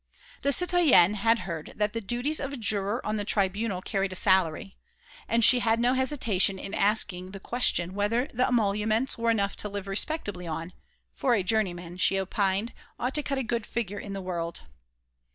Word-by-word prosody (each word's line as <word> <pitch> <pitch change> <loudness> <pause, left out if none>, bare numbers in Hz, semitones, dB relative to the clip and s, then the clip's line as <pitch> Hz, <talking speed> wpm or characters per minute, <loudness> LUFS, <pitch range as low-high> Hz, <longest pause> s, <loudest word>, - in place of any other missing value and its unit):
The 280 - +1
citoyenne 315 - +5
had 225 +3 +2
heard 165 -4 -5
say - - -12
that 210 0 -1
the 230 - -3
duties 245 +9 -1
of 275 - -4
a 280 - -6
juror 210 0 -1
of 215 0 -1
the 205 - -2
Tribunal 200 -1 -1
carried 195 -2 -2
a - - -6
salary; 190 0 +2 0.5
and 230 0 +2
she 250 - +6
had 225 -1 +1
no 245 +2 +2
hesitation 245 -8 +1
in 195 - -7
asking 190 -3 +1
the 195 - -7
question 190 -6 0
whether 210 +5 0
the 250 +2 +1
emoluments 220 +1 0
were 230 0 +1
enough 200 -3 0
to 210 - -3
live 200 -1 -6
respectably 195 - -2
on, 165 +2 -5 0.4
for 250 -3 +1
a 200 - 0
juryman, 180 -4 -2
she 190 +1 +4
opined, 195 +3 -1 0.3
ought 250 +2 -2
to 300 - +3
cut 280 -1 -3
a 265 - -1
good 235 -1 -3
figure 205 -4 -4
in 200 - -7
the 195 - -5
world. 170 -2 -4
210 Hz, 190 wpm, -27 LUFS, 190-235 Hz, 0.5 s, she